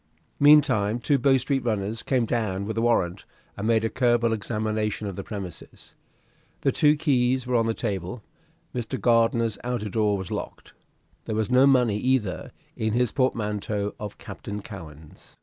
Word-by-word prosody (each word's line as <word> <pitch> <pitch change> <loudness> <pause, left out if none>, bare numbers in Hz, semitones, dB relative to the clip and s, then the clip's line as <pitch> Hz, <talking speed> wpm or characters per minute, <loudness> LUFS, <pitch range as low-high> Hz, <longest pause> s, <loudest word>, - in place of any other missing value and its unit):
Meantime 140 -8 +5
two 140 +3 +1
Bow 135 +1 +4
Street 135 +1 -1
runners 110 -1 -1
came 125 -3 +1
down 105 -4 -1
with 110 +1 -4
a 115 - 0
warrant, 115 -7 +1 0.3
and 105 - -3
made 115 -1 +3
a - - +3
careful 120 -2 +2
examination 110 -1 -2
of 100 -2 -4
the 100 - -5
premises. 95 -5 -9 0.7
The - - +2
two 150 0 +4
keys 130 -4 +1
were 125 0 -1
on 115 -1 +2
the 115 - 0
table. 105 +1 -4 0.5
Mr. 125 +1 -3
Gardiner's 115 -2 +2
outer 120 -4 -2
door 105 -1 +1
was 95 -2 -6
locked. - - -6 0.5
There 110 - -3
was 110 0 -1
no 130 +2 +6
money 125 -6 +3
either 125 -8 -1 0.2
in 110 -1 -1
his 120 -1 +1
portmanteau 105 -5 -1
of 105 -1 -7
Captain 100 0 -7
Cowen's. 80 -7 -12
115 Hz, 165 wpm, -25 LUFS, 105-125 Hz, 0.7 s, no